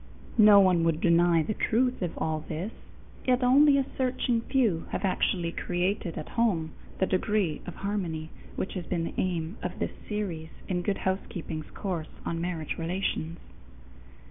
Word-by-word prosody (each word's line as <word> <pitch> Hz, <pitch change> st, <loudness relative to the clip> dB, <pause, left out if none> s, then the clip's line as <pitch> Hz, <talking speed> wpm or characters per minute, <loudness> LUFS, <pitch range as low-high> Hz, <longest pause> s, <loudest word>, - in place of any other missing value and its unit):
No 210 Hz, -1 st, +9 dB
one 185 Hz, -3 st, +5 dB
would 165 Hz, -1 st, +2 dB
deny 170 Hz, -1 st, +4 dB
the 215 Hz, -, -2 dB
truth 245 Hz, +4 st, +1 dB
of 175 Hz, -3 st, -3 dB
all 155 Hz, -1 st, -1 dB
this, 175 Hz, +6 st, -3 dB, 0.6 s
yet 250 Hz, 0 st, +3 dB
only 280 Hz, +3 st, +6 dB
a 275 Hz, -, +2 dB
searching 250 Hz, -2 st, +1 dB
few 230 Hz, -10 st, +1 dB
have -, -, -2 dB
actually 180 Hz, -2 st, +1 dB
created 180 Hz, 0 st, -1 dB
at 155 Hz, -, -5 dB
home 185 Hz, -9 st, +1 dB, 0.3 s
the 190 Hz, -, +2 dB
degree 190 Hz, -3 st, 0 dB
of 175 Hz, -, -6 dB
harmony 175 Hz, -6 st, -3 dB, 0.2 s
which -, -, -3 dB
has 180 Hz, -4 st, -5 dB
been 170 Hz, -2 st, -1 dB
the -, -, -4 dB
aim 175 Hz, +1 st, -2 dB
of 180 Hz, 0 st, -4 dB
this -, -, -2 dB, 0.2 s
series 185 Hz, -7 st, -3 dB, 0.2 s
in 180 Hz, -2 st, 0 dB
Good 195 Hz, +2 st, 0 dB
Housekeeping's 170 Hz, -4 st, -3 dB
course 175 Hz, -5 st, -3 dB, 0.2 s
on 165 Hz, 0 st, -2 dB
marriage 170 Hz, -3 st, -3 dB
relations. 170 Hz, -1 st, -2 dB
180 Hz, 160 wpm, -28 LUFS, 165-210 Hz, 0.6 s, No